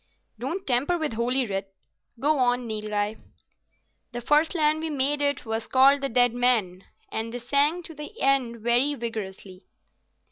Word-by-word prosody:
"Don't 330 +11 -4
tamper 275 +7 +1
with 310 -7 -2
Holy 245 +3 0
Writ. 195 -2 -5 0.4
Go 295 +2 +1
on, 245 0 +1
Nilghai." 210 -1 -3 1.0
"The 240 - -5
first 300 +7 +2
land 310 -1 +2
we 320 0 -3
made 290 0 +2
it 285 -2 0
was 225 0 -3
called 275 +2 +5
the 275 - -2
Deadman," 240 -6 +2 0.3
and 225 +1 -4
they 245 - -5
sang 285 +8 0
to 325 - -10
the 305 +9 -10
end 255 -4 +1
very 245 +5 +2
vigourously. 200 -6 -6
245 Hz, 150 wpm, -25 LUFS, 225-290 Hz, 1.0 s, called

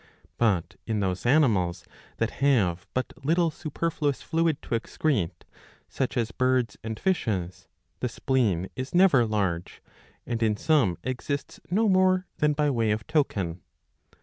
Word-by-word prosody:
But 100 -8 +1
in 110 -2 0
those 95 +2 -1
animals 110 - +2 0.3
that - - 0
have 95 -11 +2
but 130 - -1
little 165 +3 +2
superfluous 150 -2 -2
fluid 165 -2 +1
to - - -13
excrete, 115 - -1 0.5
such 130 -1 -2
as 115 -2 0
birds 130 -3 +1
and 110 -1 -5
fishes, 105 - -1 0.3
the 125 - -1
spleen 115 -9 0
is 130 +5 -5
never 170 -11 +5
large, 95 -5 -2 0.5
and 120 -1 -3
in 110 -2 +2
some 140 - +2
exists 135 +2 -4
no 215 +5 +2
more 185 -1 +3
than 150 0 +2
by 145 0 +1
way 115 -4 +1
of 105 +1 -1
token. 100 - -1
125 Hz, 140 wpm, -27 LUFS, 105-150 Hz, 0.5 s, never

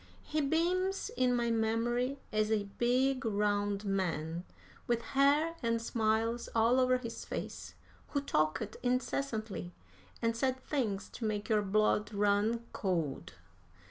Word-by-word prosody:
He 305 0 -1
beams 360 +6 +1
in 250 0 +3
my 235 -1 +1
memory 235 +4 +1
as 215 0 +1
a 215 -2 +2 0.2
big, 255 +2 +2
round 205 -1 0
man, 175 -3 -1 0.4
with 235 -1 +1
hair 290 +4 +4
and 230 -1 +1
smiles 225 +1 0
all 230 +3 +4
over 255 0 +4
his 235 -2 -6
face, - - -6 0.3
who 285 - -1
talked 195 - 0
incessantly, 245 -7 -2 0.4
and 230 -1 0
said 260 +2 0
things 240 -8 -2
to 230 - -6
make 210 0 -2
your 215 -1 +4
blood 210 +1 +2
run 205 +3 +2
cold. 165 - -2
230 Hz, 130 wpm, -33 LUFS, 205-255 Hz, 0.4 s, hair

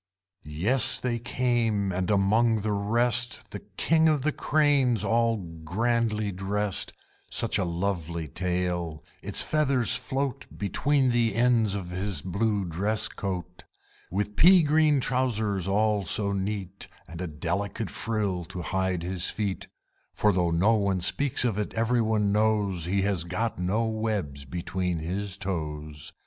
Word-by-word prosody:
Yes, 115 - +3
they 120 -2 -2
came; 115 -5 0
and 90 0 -2
among 110 +3 +3
the 105 +1 -1
rest 120 +4 0
The - - -6 0.2
King 160 0 +3
of 150 -4 +1
the 155 - +2
Cranes 140 -8 +2
all 115 0 +2 0.3
grandly 110 +3 0
dressed. 100 +1 -1 0.4
Such 115 -3 +1
a - - +1
lovely 85 -2 -3
tail! 90 -1 -2 0.2
Its - - +1
feathers 140 -6 +2
float 135 -1 -3
Between 130 +7 +1
the 120 -1 +1
ends 115 -4 +3
of 90 -3 -5
his 95 -4 -3
blue 100 +2 0
dress 100 +6 0
coat; 90 -2 -5 0.5
With 105 +2 -2
pea 180 - +7
green 150 -2 +3
trowsers 110 -8 0
all 105 +1 +1
so 100 +3 +1
neat, 100 -1 -4 0.2
And 85 +1 -8
a 90 - -3
delicate 90 +6 -3
frill 105 -5 -1
to 90 +2 -7
hide 95 -1 -1
his 90 0 -2
feet 100 -3 -3 0.5
(For 105 -1 +3
though 90 -2 +1
no 90 +7 +3
one 100 -3 0
speaks 130 +7 +1
of 110 -4 0
it, 105 - -4
every 115 +1 +2
one 110 -2 +1
knows 105 -5 +1
He 95 +2 0
has 95 -4 +1
got 95 +6 -3
no 100 +6 0
webs 105 -11 -3
between 90 +4 -3
his 95 +5 -3
toes). 75 -6 -4
100 Hz, 145 wpm, -27 LUFS, 90-115 Hz, 0.5 s, pea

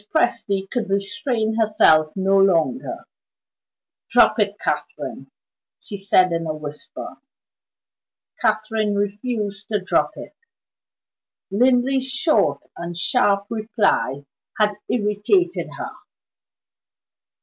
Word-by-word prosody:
Presty 205 -9 +1
could 230 -5 -2
restrain 220 +2 -1
herself 210 -8 +4
no 195 0 +2
longer. 195 - +1 1.0
"Drop - - +5
it, - - +1
Catherine!" - - -4 0.5
she 210 - -8
said 190 -2 +3
in 165 -1 -2
a 155 - -2
whisper. 150 -1 -8 1.2
Catherine 215 -1 0
refused 205 0 -3
to 210 -2 0
drop 185 - 0
it; - - -9 1.2
Linley's 255 +4 +2
short 290 +4 +1
and 170 0 -6
sharp 200 0 +2
reply 210 - 0 0.3
had 210 -1 +2 0.2
irritated 235 - +1
her. - - -5
210 Hz, 95 wpm, -22 LUFS, 195-240 Hz, 1.2 s, Drop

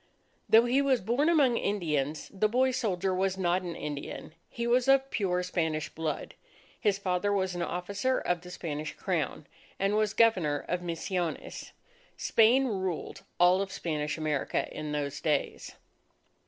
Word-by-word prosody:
Though 225 +2 +7
he 255 +3 +3
was 270 -3 +3
born 245 - +1
among 280 -8 +4
Indians, 155 -7 -1
the 210 +2 +1
boy 260 +3 +3
soldier 195 -6 -1
was 190 +1 0
not 180 0 +1
an 175 -2 -5
Indian. 145 +1 -6 0.2
He 235 - -4
was 245 +1 +2
of 270 0 +4
pure 180 -4 0
Spanish 160 -4 -1
blood. 160 -1 -4 0.5
His 205 -4 +2
father 195 +1 0
was 190 -2 0
an 175 - -4
officer 200 +9 -1
of 175 -2 -1
the 180 - -11
Spanish 155 -4 -5
Crown, - - -2 0.3
and 195 +1 +1
was 215 0 +1
Governor 180 -11 +3
of 180 0 -1
Misiones. 175 0 -4 0.5
Spain 235 +4 +4
ruled 190 -8 -3 0.2
all 180 +2 +5
Spanish 155 -6 -3
America 155 -3 -1
in 150 -1 -4
those 145 -1 -3
days. 150 -3 -1
185 Hz, 150 wpm, -29 LUFS, 160-220 Hz, 0.5 s, Though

